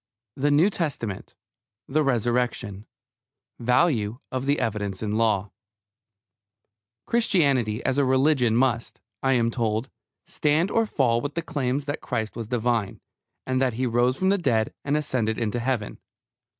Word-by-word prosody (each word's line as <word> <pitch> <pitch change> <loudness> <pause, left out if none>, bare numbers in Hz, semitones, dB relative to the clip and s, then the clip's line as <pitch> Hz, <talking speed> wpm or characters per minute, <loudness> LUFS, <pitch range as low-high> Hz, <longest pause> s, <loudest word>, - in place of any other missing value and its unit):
THE 145 +2 +1
NEW 155 +8 +4
TESTAMENT 130 - -4 0.5
THE 155 +3 +1
RESURRECTION 120 -5 -1 0.7
VALUE 120 -3 +2
OF 130 +1 -3
THE 145 +1 +2
EVIDENCE 105 -4 -2
IN 105 - -2
LAW 105 -3 +1 1.5
Christianity 140 - +2
as 135 +2 +1
a - - +4
religion 130 -3 +3
must, 120 -2 0 0.2
I 135 0 +2
am 115 -2 +2
told, 115 +1 -1 0.3
stand 155 +6 +1
or 225 -1 +2
fall 120 - +1
with 145 +2 -5
the 170 - -2
claims 140 -3 -2
that 145 0 -3
Christ 110 -1 -3
was 115 -2 -5
divine, 120 -3 -1 0.5
and 130 0 0
that 130 -3 +2
He 130 +3 -1
rose 120 +2 +2
from 190 - +1
the 200 0 +2
dead 120 -9 +1
and 145 +1 +1
ascended 120 -7 -1
into 115 +1 -1
Heaven. 120 -4 -2
125 Hz, 145 wpm, -25 LUFS, 115-145 Hz, 1.5 s, NEW